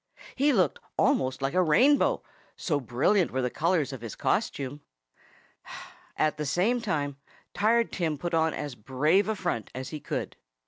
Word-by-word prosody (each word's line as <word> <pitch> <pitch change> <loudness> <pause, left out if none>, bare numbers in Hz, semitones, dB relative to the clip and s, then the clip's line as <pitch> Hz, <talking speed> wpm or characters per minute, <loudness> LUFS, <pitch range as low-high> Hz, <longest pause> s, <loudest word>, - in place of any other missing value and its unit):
He 285 +2 +3
looked 190 -9 +2 0.2
almost 130 +1 +1
like 135 - 0
a 185 - +3
rainbow, 250 - +4 0.3
so 150 -5 0
brilliant 140 - +2
were 130 0 -2
the 125 - -1
colors 160 -3 0
of 130 - -7
his 115 -2 -7
costume. 145 - -1 1.4
At 155 0 +1
the 150 - -3
same 215 - +1
time 145 -9 -2 0.4
Tired 230 +2 +2
Tim 160 -5 -1
put 175 +4 -4
on 160 0 +3
as 145 -2 -5
brave 140 - +1
a 220 - 0
front 175 - -3
as 130 0 -5
he 155 - -6
could. - - -4
155 Hz, 165 wpm, -28 LUFS, 135-190 Hz, 1.4 s, rainbow